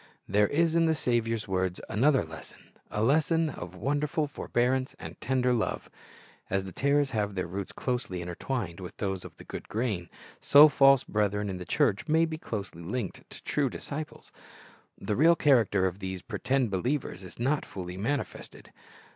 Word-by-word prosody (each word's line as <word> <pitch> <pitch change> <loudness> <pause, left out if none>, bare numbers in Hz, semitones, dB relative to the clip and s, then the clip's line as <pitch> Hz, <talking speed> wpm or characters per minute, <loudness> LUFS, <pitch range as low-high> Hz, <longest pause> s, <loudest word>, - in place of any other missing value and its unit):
There 105 +1 +3
is 165 +5 +2
in 165 0 +4
the 160 - +2
Saviour's 115 -5 0
words 95 -1 -1
another 135 +6 +3
lesson, 80 -1 -12 0.2
a 105 - -1
lesson 160 +4 +3
of 90 -4 -8
wonderful 145 - 0
forbearance 130 -1 -1
and - - -9
tender 125 -1 +1
love. 115 -3 -2 0.6
As 95 0 0
the 95 - -7
tares 140 +4 +2
have 105 -3 -1
their 90 - -1
roots 95 +3 -5
closely 125 -8 -3
intertwined 90 +2 -4
with 90 -2 -8
those 95 -2 -2
of - - -11
the - - -11
good - - -8
grain, 105 -7 -2 0.3
so 150 +2 +8
false 135 -2 +5
brethren 105 -1 0
in 95 - -4
the 90 - -7
church 130 - +1
may 160 +2 +4
be 160 -1 -5
closely 100 - -5
linked 100 +3 -4
with - - -13
true 145 -3 +1
disciples. 150 +5 -7 0.7
The 105 - -2
real 165 +7 +6
character 115 - +3
of 95 +1 -2
these 95 -2 -5
pretended 120 +2 0
believers 110 -1 -2
is 90 - -11
not 140 +5 +1
fully 90 -2 -7
manifested. 130 +9 -4
115 Hz, 170 wpm, -29 LUFS, 95-145 Hz, 0.7 s, so